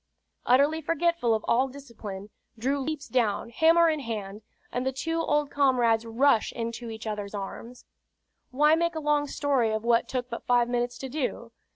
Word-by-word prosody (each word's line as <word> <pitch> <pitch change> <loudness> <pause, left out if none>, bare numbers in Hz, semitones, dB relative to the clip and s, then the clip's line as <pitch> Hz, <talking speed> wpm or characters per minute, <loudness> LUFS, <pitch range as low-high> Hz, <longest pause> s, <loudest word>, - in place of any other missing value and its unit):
Utterly 285 +6 +4
forgetful 330 -6 +1
of 220 - -4
all 255 +3 +3
discipline, 220 -7 -9 0.3
Drew 270 +5 0
leaps 295 +1 -4
down, 230 -3 0
hammer 330 +6 +5
in 310 -2 +1
hand, 215 -5 -5 0.3
and 245 - -2
the 265 - 0
two 325 +5 -2
old 295 -2 0
comrades 240 -5 +2
rush 230 0 +2
into 230 0 -5
each 220 0 -8
other's 210 -1 -4
arms. 230 +5 -7 0.6
Why 300 +4 +4
make 335 +1 +1
a - - -2
long 295 -1 +1
story 275 -5 +1
of 220 0 -2
what 235 0 +2
took 250 -1 -2
but 235 -2 -7
five 245 -1 +3
minutes 245 0 -1
to 265 - -6
do? 250 -4 -4
250 Hz, 175 wpm, -27 LUFS, 230-290 Hz, 0.6 s, hammer